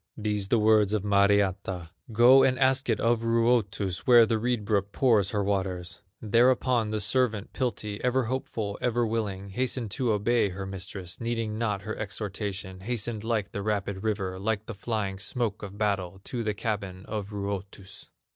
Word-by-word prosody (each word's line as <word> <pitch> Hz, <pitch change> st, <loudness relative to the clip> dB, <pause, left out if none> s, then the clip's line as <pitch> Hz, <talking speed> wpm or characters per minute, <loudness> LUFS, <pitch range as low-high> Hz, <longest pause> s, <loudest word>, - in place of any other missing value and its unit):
These 105 Hz, -2 st, -1 dB
the 115 Hz, -, +3 dB
words 110 Hz, -1 st, +4 dB
of 105 Hz, -, -1 dB
Mariatta: 100 Hz, -3 st, +1 dB, 0.2 s
"Go 120 Hz, +4 st, +7 dB
and 130 Hz, -1 st, +3 dB
ask 130 Hz, 0 st, +2 dB
it 110 Hz, -, +2 dB
of 115 Hz, 0 st, +2 dB
Ruotus, 115 Hz, -5 st, +1 dB
Where 120 Hz, -2 st, +8 dB
the 110 Hz, 0 st, 0 dB
reed 120 Hz, -2 st, -1 dB
brook 100 Hz, -1 st, 0 dB
pours 110 Hz, -7 st, +3 dB
her 105 Hz, -1 st, -1 dB
waters." 95 Hz, -3 st, -2 dB, 0.2 s
Thereupon 120 Hz, +1 st, +3 dB
the 110 Hz, 0 st, -1 dB
servant, 110 Hz, -1 st, +1 dB
Piltti, 110 Hz, -5 st, -3 dB
Ever 125 Hz, +1 st, +2 dB
hopeful, 110 Hz, -4 st, -3 dB
ever 120 Hz, -1 st, +1 dB
willing, 105 Hz, -3 st, -3 dB
Hastened 120 Hz, +1 st, -2 dB
to 125 Hz, +1 st, 0 dB
obey 105 Hz, +1 st, +2 dB
her 95 Hz, +1 st, -6 dB
mistress, 95 Hz, -1 st, -7 dB
Needing 115 Hz, -2 st, -2 dB
not 105 Hz, -4 st, -1 dB
her 110 Hz, +1 st, -4 dB
exhortation; 100 Hz, -3 st, -4 dB
Hastened 110 Hz, +1 st, -3 dB
like 110 Hz, -3 st, -1 dB
the 100 Hz, -, -4 dB
rapid 100 Hz, -2 st, -2 dB
river, 100 Hz, -4 st, -2 dB
Like 110 Hz, +1 st, -1 dB
the 115 Hz, -, -6 dB
flying 100 Hz, -2 st, -3 dB
smoke 110 Hz, +1 st, -2 dB
of 100 Hz, 0 st, -8 dB
battle 95 Hz, -3 st, -1 dB
To 120 Hz, -2 st, -4 dB
the 105 Hz, -1 st, -1 dB
cabin 100 Hz, -3 st, -4 dB
of 105 Hz, -2 st, -4 dB
Ruotus. 100 Hz, -1 st, -6 dB
105 Hz, 165 wpm, -27 LUFS, 100-115 Hz, 0.2 s, Where